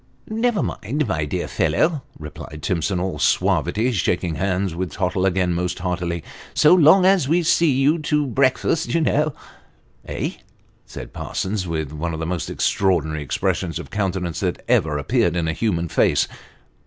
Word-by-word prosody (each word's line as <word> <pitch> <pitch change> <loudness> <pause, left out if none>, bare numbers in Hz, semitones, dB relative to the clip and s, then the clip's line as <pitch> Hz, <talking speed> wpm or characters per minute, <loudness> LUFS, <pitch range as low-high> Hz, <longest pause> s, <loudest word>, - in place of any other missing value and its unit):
" - - -36
Never 225 -2 0
mind, 140 +5 -2
my 80 -6 -1
dear 75 - -3
fellow," 155 -3 +1 0.2
replied 75 0 -9
Timson, 90 -1 0
all 90 -4 -3
suavity, 115 - +1
shaking 90 -5 0
hands 95 +1 -1
with 85 -1 -4
Tottle 95 0 0
again 90 -1 +1
most 90 +1 -2
heartily, 90 -2 -3 0.3
"so 155 +2 +6
long 180 +2 +6
as 190 -7 +4
we 170 +4 +2
see 165 0 +3
you 135 +5 +2
to 150 -1 0
breakfast, 135 +6 +1
you 165 - +3
know 150 -1 +1 0.3
" - - -35
Eh! - - -3 0.2
" - - -36
said - - -9
Parsons, 95 -1 -3
with 80 -4 -3
one 80 +2 -3
of - - -6
the 80 - -2
most 85 -1 -3
extraordinary 80 -6 0
expressions 80 +4 -1
of 80 -5 -8
countenance 95 -5 -2
that - - -3
ever 75 -1 +2
appeared 80 +4 +1
in 85 -2 0
a 80 - 0
human 85 -4 -1
face. - - +2
95 Hz, 170 wpm, -22 LUFS, 85-140 Hz, 0.3 s, so